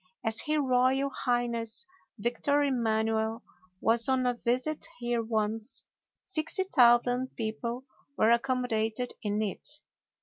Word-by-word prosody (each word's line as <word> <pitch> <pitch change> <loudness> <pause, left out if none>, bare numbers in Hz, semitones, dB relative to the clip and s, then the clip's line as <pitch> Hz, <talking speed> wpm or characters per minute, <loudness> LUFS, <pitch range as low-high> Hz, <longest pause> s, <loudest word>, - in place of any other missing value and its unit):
As 220 -1 +5
his 305 0 0
royal 265 0 +2
highness 240 0 -1 0.3
Victor 245 +6 +1
Emanuel 225 -3 0 0.4
was 230 +2 +3
on 260 -1 +2
a 250 - +2
visit 250 +6 -1
here 240 -1 -1
once, 220 +2 -2 0.4
60,000 260 -8 +2
people 235 +3 -4 0.3
were 220 +1 +4
accommodated 245 -1 0
in 210 0 -1
it. 210 +6 -3
240 Hz, 105 wpm, -29 LUFS, 225-260 Hz, 0.4 s, As